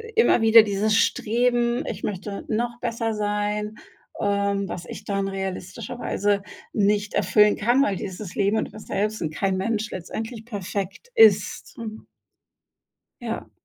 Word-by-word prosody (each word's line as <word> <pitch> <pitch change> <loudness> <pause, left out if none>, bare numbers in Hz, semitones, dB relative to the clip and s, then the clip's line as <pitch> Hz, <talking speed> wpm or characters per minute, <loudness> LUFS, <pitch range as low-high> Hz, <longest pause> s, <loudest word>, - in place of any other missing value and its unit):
immer 450 - +5
wieder 225 0 +8
dieses 210 0 +1
Streben: 240 +2 +2
„Ich 210 -2 -5
möchte 200 0 -4
noch 235 +2 -2
besser 230 -2 -2
sein.“ 210 0 -1 0.4
Ähm, 200 -1 0
was 170 -1 -6
ich - - -8
dann 195 -1 -1
realistischerweise 200 +2 -2 0.3
nicht 205 0 +1
erfüllen 210 -1 +4
kann, 240 +6 +3
weil 195 -8 0
dieses 190 -1 -6
Leben 205 +2 +1
und - - -2
man 215 - -10
selbst 210 +2 -2
und 155 -2 -2
kein 190 +3 0
Mensch 215 +2 -1
letztendlich 220 +5 -6
perfekt 200 - -5
ist, 450 -2 +4
mhm. 220 -2 -7 1.2
Ja. - - -5
210 Hz, 135 wpm, -24 LUFS, 200-230 Hz, 1.2 s, wieder